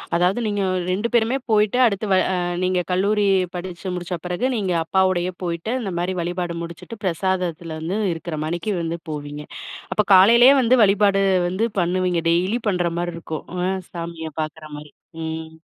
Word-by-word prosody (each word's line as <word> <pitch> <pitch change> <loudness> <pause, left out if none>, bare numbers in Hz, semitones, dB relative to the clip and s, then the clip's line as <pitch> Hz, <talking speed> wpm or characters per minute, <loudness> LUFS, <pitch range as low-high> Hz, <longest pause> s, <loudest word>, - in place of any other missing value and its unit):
அதாவது 180 +6 +2
நீங்க 205 -1 -1
அ - - 0 0.2
2 205 +5 0
பேருமே 235 +1 +2
போயிட்டு 215 +2 +3
அடுத்து 215 -3 +2
வ - - +5 0.2
அ - - 0 0.3
நீங்க 185 0 +1
கல்லூரி 205 +3 +2 0.3
படிச்சு 180 +1 -5
முடிச்ச 175 0 -4
பிறகு, 180 +7 -2
நீங்க 195 -5 -1
அப்பாவோடையே 185 +1 +1
போயிட்டு 170 +5 -3
இந்த 195 - -3
மாரி 180 +2 -1
வழிபாடு 175 0 -3
முடிச்சுட்டு, 170 +6 -8
பிரசாதத்துல 175 -2 -2
வந்து 170 +6 -2 0.2
இருக்கிற 165 -1 -6
மாணிக்கு 170 +6 -2
வந்து 165 0 -3
போவீங்க. 145 0 -6 0.5
அப்போ 210 - +1
காலையிலேயே 235 +8 +8
வந்து 250 +1 +4
வழிபாடு 200 0 +3 0.3
வந்து 190 +6 0
பண்ணுவீங்க, 180 0 +1
டெய்லி 185 +7 +1
பண்ற 175 -3 0
மாரி 175 0 -2
இருக்கும். 160 -2 -6 0.2
அ - - +1 0.2
சாமியை 165 -2 -6
பார்க்குற 155 0 -6
மாரி. 150 0 -11 0.3
ம். 160 0 -5
180 Hz, 160 wpm, -22 LUFS, 170-200 Hz, 0.5 s, காலையிலேயே